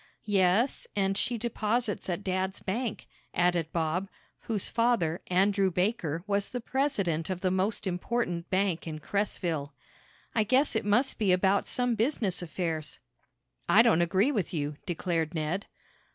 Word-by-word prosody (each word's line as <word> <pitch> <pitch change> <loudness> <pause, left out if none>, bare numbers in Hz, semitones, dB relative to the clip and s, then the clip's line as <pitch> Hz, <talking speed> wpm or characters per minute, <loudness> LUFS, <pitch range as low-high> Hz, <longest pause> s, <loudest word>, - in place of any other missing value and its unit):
"Yes, 205 +4 +2
and 195 -1 +1
she 235 +4 0
deposits 225 -2 -1
at 180 +3 -2
dad's 190 0 -1
bank," 225 +3 -3 0.3
added 175 -2 +2
Bob, 170 +4 -1 0.3
whose 215 -4 -1
father, 230 -8 +1
Andrew 195 +1 +3
Baker, 180 -4 -1
was 200 -1 0
the 250 - -3
president 205 - 0
of 185 -1 -3
the 185 -2 +1
most 190 +4 0
important 180 -1 -2
bank 185 -3 0
in 155 -1 -4
Cresville. 165 -5 -2 0.6
"I 220 - +3
guess 260 +6 +2
it 220 - 0
must 240 +6 +2
be 205 -4 +3
about 190 +2 +3
some 245 -1 +1
business 225 - 0
affairs." 160 -3 -3 0.7
"I 225 - +7
don't 220 -8 +4
agree 190 +10 +3
with 200 - -2
you," 145 -1 -2
declared 170 -1 -1
Ned. 160 +6 -2
190 Hz, 145 wpm, -29 LUFS, 175-220 Hz, 0.7 s, I